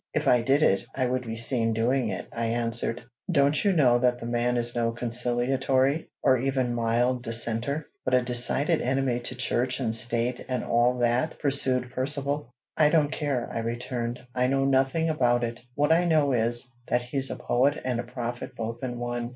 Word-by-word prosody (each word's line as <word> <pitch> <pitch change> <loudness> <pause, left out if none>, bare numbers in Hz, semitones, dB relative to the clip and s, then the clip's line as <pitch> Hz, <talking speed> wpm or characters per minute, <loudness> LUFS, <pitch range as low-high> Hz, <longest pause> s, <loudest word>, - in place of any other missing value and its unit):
"If - - 0
I 125 - +5
did 135 +5 +2
it, 95 - +3
I 130 - +1
would 125 -1 -2
be 115 - -4
seen 115 0 +1
doing 120 +2 +1
it," - - -5
I 115 0 -2
answered. 115 0 -1 0.3
"Don't 145 -1 +2
you 200 - +3
know 130 -9 +4
that 125 0 +1
the 115 - -7
man 120 +1 0
is 120 0 -2
no 115 -1 +1
conciliatory, 125 +4 0
or 130 -2 +4
even 130 -1 0
mild 120 +2 +1
dissenter, 115 +5 -2 0.2
but 130 - +2
a 125 - +3
decided 130 +6 +1
enemy 130 -1 0
to 125 +1 -5
Church 125 +1 0
and 115 -4 -1
State 120 +2 +1
and 130 -1 -1
all 120 +2 +2
that?" 125 +5 0
pursued 130 -3 0
Percivale. 140 0 -2 0.2
"I 150 -1 +4
don't 150 -2 +2
care," 140 -6 -2
I - - -2
returned. 120 +1 -3
"I 125 0 +1
know 135 +1 +1
nothing 135 +4 +2
about 120 -6 +2
it. 120 +1 -3 0.2
What 145 +2 +2
I 170 +2 +4
know 155 -4 +3
is, 120 +1 0
that 125 - +1
he's 130 +2 0
a - - -3
poet 140 +5 +1
and 125 -2 -1
a - - -2
prophet 120 -1 -6
both 115 +2 -5
in 120 -1 -3
one. 120 0 -3
125 Hz, 190 wpm, -26 LUFS, 120-135 Hz, 0.3 s, I